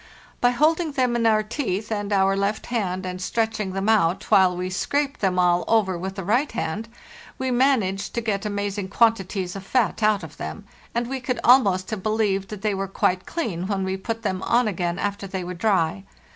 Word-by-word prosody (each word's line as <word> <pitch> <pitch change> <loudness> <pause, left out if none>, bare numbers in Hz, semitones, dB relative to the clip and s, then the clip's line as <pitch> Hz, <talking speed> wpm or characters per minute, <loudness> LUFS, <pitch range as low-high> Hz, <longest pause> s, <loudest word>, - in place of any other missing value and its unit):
By 245 - +4
holding 310 +5 +2
them 255 -3 +1
in 230 -1 +2
our 215 -1 +3
teeth 215 -3 -3
and 205 -1 -2
our 195 -1 +3
left 200 +2 -1
hand 185 -5 -1
and 185 0 -5
stretching 220 -1 -1
them 195 +1 -2
out, 200 -5 +2
while 190 -3 +5
we 185 +1 -3
scraped 280 +8 -1
them 190 -2 +1
all 175 -1 +3
over 210 -5 +2
with 190 +2 -5
the 195 - -5
right 240 - +1
hand, 215 +8 -3 0.5
we 260 0 -2
managed 240 -7 +1
to 235 - 0
get 210 -3 -1
amazing 205 -1 -2
quantities 195 -4 +1
of 195 - -6
fat 230 +2 0
out 210 -1 +3
of - - -10
them; - - -6 0.3
and 235 0 +1
we 265 +2 -4
could 255 -1 -2
almost 200 -7 +4
have 215 -3 -3
believed 205 -2 0
that 210 -2 -8
they 210 -1 +1
were 195 0 -2
quite 185 -1 0
clean 190 - -3
when 195 -2 -1
we 190 0 -1
put 225 +4 -4
them 185 -3 -1
on 240 +3 +2
again 175 -3 -2
after 200 -1 -3
they 190 -1 -4
were 180 +1 -5
dry. 170 - +1
205 Hz, 205 wpm, -24 LUFS, 190-230 Hz, 0.5 s, while